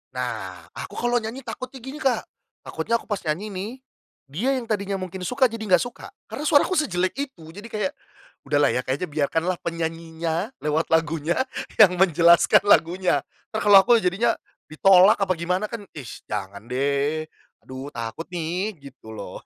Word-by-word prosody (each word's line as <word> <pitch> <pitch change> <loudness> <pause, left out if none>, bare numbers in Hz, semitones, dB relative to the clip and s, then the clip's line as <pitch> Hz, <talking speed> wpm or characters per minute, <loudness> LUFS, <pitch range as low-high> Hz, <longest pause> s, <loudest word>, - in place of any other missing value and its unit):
Nah - - -5
aku - - -8
kalau 240 0 +1
nyanyi 235 +4 -6
takutnya 255 +2 -7
gini 275 +3 -7
Kak, 265 -4 +1 0.4
takutnya 230 - -2
aku - - -3
pas 205 - -1
nyanyi 165 +8 -1
nih, 195 +4 -4 0.6
dia 220 - -1
yang 250 -2 -3
tadinya 200 -2 -1
mungkin 185 -1 -6
suka 255 +6 +3
jadi 230 -1 -5
gak 175 - +1
suka 245 - -9 0.2
karena - - -5
suaraku 290 +6 +4
sejelek 185 - 0
itu 275 - -5
jadi 205 +6 -10
kayak, 210 -4 -2 0.6
udahlah 145 0 +3
ya - - 0
kayaknya 140 +7 -2
biarkanlah 165 +4 0
penyanyinya 165 +3 -3
lewat 150 +2 0
lagunya 160 +1 +1 0.4
yang 180 -4 +7
menjelaskan 170 0 +5
lagunya 185 -2 +3 0.3
entar 220 - -2
kalau 205 -2 +9
aku 235 -1 +5
jadinya 215 +5 +1 0.4
ditolak 190 +5 +6
apa 195 -2 +2
gimana 180 +4 -1
kan, 230 -3 -5
ih, 135 -6 -7 0.2
jangan 100 -1 -5
deh, 140 +4 0 0.4
aduh 130 +2 -8
takut 115 +8 -5
nih 180 +4 -3 0.2
gitu 110 -3 -14
loh. - - -7
180 Hz, 160 wpm, -24 LUFS, 160-220 Hz, 0.6 s, kalau